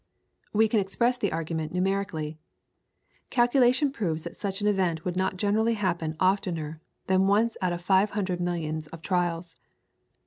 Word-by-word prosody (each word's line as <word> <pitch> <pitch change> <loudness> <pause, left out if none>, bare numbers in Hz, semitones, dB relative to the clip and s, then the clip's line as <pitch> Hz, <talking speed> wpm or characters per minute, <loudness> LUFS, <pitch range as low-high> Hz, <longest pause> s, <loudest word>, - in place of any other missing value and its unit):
We 220 +1 +4
can 220 0 +2
express 235 +6 +1
the 205 -5 0
argument 160 0 -3
numerically. 180 -5 -1 0.9
Calculation 255 +2 +3
proves 170 - -2
that 170 - -7
such 195 0 -3
an 205 - -2
event 185 -6 +1
would 180 -1 -2
not 190 0 0
generally 220 +4 +2
happen 170 -6 -1
oftener 170 -5 0 0.2
than 190 0 +3
once 220 +3 +3
out 185 -1 +1
of 175 0 -4
five 190 +3 +4
hundred 185 -3 -1
millions 160 -3 -2
of 165 +1 -11
trials. 175 -2 -1
185 Hz, 150 wpm, -27 LUFS, 165-205 Hz, 0.9 s, We